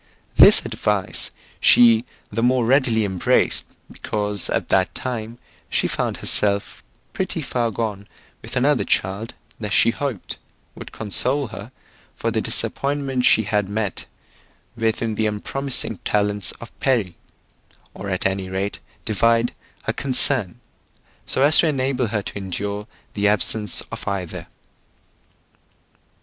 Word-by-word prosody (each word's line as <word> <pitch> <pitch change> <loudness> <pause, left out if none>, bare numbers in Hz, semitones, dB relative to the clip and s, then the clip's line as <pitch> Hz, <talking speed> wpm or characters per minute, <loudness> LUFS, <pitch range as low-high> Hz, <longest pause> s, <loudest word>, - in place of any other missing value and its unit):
This - - +8
advice 105 -3 -1 0.3
she 115 -1 +5 0.3
the 115 +2 -2
more 125 0 +2
readily 120 -4 +2
embraced, 95 -3 +2 0.3
because 105 -2 -3
at - - -2
that 95 0 +1
time 115 -2 -4 0.3
she - - +1
found - - -2
herself 100 -1 +1 0.3
pretty 175 -4 -3
far 120 -3 -1
gone 105 -2 -4 0.3
with - - -8
another 140 +2 +2
child 100 +5 -1 0.2
that 105 -2 -4
she 115 - +4
hoped 130 -6 -4 0.3
would - - -10
console 125 +5 0
her 110 +1 -9 0.4
for - - -2
the - - -1
disappointment 140 -3 0
she 110 - +5
had 105 -1 -1
met 105 -2 -3 0.7
with 115 -1 -1
in 115 -1 -1
the 110 +1 0
unpromising 115 +1 -1
talents 105 -1 0
of 115 - -14
Perry, 115 -10 0 0.8
or 100 - -7
at 95 -1 -2
any 95 -1 -1
rate 95 +2 -3 0.3
divide 115 +3 +2 0.3
her - - -2
concern, 130 -7 +3 0.7
so 130 - +1
as 150 +2 +7
to 170 - +5
enable 130 -4 0
her 105 -1 -2
to - - -6
endure 100 +2 -4 0.3
the 100 0 +1
absence 105 -1 +2
of - - -7
either. 95 -4 -4
110 Hz, 130 wpm, -21 LUFS, 100-125 Hz, 0.8 s, This